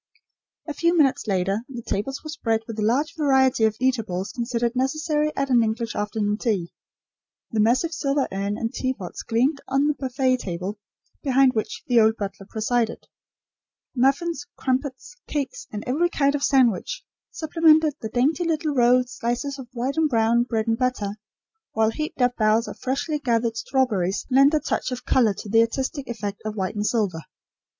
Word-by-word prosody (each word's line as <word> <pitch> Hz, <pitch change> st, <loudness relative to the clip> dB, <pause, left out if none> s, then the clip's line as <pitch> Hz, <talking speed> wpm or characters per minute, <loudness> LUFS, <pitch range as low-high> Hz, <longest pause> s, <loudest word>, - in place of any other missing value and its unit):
A 300 Hz, -, -3 dB
few 340 Hz, +3 st, +1 dB
minutes 275 Hz, -6 st, +2 dB
later 195 Hz, +1 st, +1 dB
the 240 Hz, -3 st, -7 dB
tables 265 Hz, +8 st, -3 dB
were 310 Hz, -, -7 dB
spread 225 Hz, -7 st, -1 dB
with 225 Hz, -1 st, -7 dB
the -, -, -2 dB
large 270 Hz, +9 st, +1 dB
variety 265 Hz, -6 st, +3 dB
of 215 Hz, -1 st, +1 dB
eatables 220 Hz, -7 st, -1 dB
considered 235 Hz, +1 st, -2 dB
necessary 300 Hz, +3 st, 0 dB
at 275 Hz, -1 st, -1 dB
an 240 Hz, -2 st, +5 dB
English 225 Hz, +1 st, -2 dB
afternoon 210 Hz, 0 st, -1 dB
tea; 195 Hz, -8 st, -1 dB, 0.8 s
the 220 Hz, -, -1 dB
massive 250 Hz, +10 st, +2 dB
silver 280 Hz, -3 st, 0 dB
urn 200 Hz, +2 st, -2 dB
and 225 Hz, 0 st, -3 dB
teapots 255 Hz, -9 st, -4 dB
gleamed 265 Hz, +6 st, +1 dB
on 270 Hz, +2 st, +2 dB
the 300 Hz, -, +2 dB
buffet 260 Hz, -1 st, 0 dB
table, 190 Hz, 0 st, -5 dB, 0.4 s
behind 270 Hz, -2 st, +4 dB
which 220 Hz, -3 st, -3 dB
the 240 Hz, -2 st, +4 dB
old 220 Hz, 0 st, +4 dB
butler 200 Hz, -1 st, -6 dB
presided; 225 Hz, +1 st, -1 dB, 0.9 s
muffins, 280 Hz, +4 st, +1 dB
crumpets, 260 Hz, +4 st, -2 dB
cakes, 300 Hz, -, -4 dB
and 210 Hz, -1 st, -5 dB
every 310 Hz, +8 st, +1 dB
kind 280 Hz, -4 st, +2 dB
of 290 Hz, -, -1 dB
sandwich 270 Hz, -, +2 dB, 0.3 s
supplemented 315 Hz, -1 st, +3 dB
the 220 Hz, -, -4 dB
dainty 275 Hz, +9 st, +1 dB
little 315 Hz, -2 st, 0 dB
rolled 250 Hz, 0 st, +4 dB
slices 250 Hz, +3 st, -3 dB
of 260 Hz, -, -8 dB
white 255 Hz, +4 st, -3 dB
and 320 Hz, -1 st, +3 dB
brown 230 Hz, 0 st, +3 dB
bread 225 Hz, -3 st, -1 dB
and 225 Hz, 0 st, 0 dB
butter, 250 Hz, -6 st, 0 dB, 0.6 s
while 220 Hz, 0 st, +2 dB
heaped 305 Hz, 0 st, -3 dB
up 245 Hz, 0 st, +2 dB
bowls 220 Hz, +2 st, +3 dB
of -, -, -8 dB
freshly 285 Hz, +4 st, -2 dB
gathered 230 Hz, -4 st, 0 dB
strawberries 225 Hz, -7 st, 0 dB
lent 275 Hz, +4 st, +5 dB
a -, -, +3 dB
touch -, -, -2 dB
of 250 Hz, -, -5 dB
colour 225 Hz, -6 st, +3 dB
to 210 Hz, -, -8 dB
the 225 Hz, +3 st, +4 dB
artistic 265 Hz, +4 st, -2 dB
effect 205 Hz, -3 st, -5 dB
of 215 Hz, 0 st, -4 dB
white 190 Hz, -3 st, -2 dB
and 210 Hz, 0 st, -1 dB
silver. 200 Hz, -8 st, 0 dB
250 Hz, 175 wpm, -24 LUFS, 220-280 Hz, 0.9 s, an